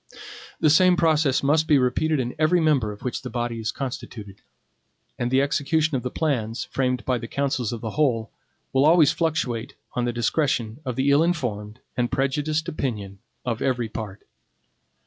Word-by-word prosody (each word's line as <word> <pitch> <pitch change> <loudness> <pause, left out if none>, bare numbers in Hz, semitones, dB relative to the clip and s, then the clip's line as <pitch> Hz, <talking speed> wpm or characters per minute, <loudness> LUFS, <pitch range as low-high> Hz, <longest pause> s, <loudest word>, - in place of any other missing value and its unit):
The 155 - +4
same 180 +2 +5
process 155 -6 +2
must 155 +3 +3
be 150 - +5
repeated 135 +4 +1
in 125 -1 -2
every 160 +3 +4
member 145 -9 +2
of 105 - -11
which 125 +1 -3
the 130 - -6
body 120 -2 -3
is 110 -1 -2
constituted; 110 -7 -7 0.8
and 120 - 0
the 130 +2 +3
execution 150 +2 +1
of 130 - 0
the 125 - -3
plans, 120 -7 -1
framed 125 -1 -1
by 125 -2 +1
the 115 - -6
councils 135 -4 -1
of 115 -2 -5
the 110 - -4
whole, 120 -7 0 0.4
will 135 +2 +4
always 160 -2 +6
fluctuate 145 -8 -2 0.2
on 125 - -1
the 120 - 0
discretion 120 -1 0
of 125 -2 -3
the 135 +2 +2
ill 140 +2 +5
informed 115 -11 -2
and 120 -1 0
prejudiced 150 +4 0
opinion 105 - -4 0.3
of 120 -2 -2
every 125 -4 0
part. 105 -3 -7
130 Hz, 175 wpm, -24 LUFS, 115-150 Hz, 0.8 s, always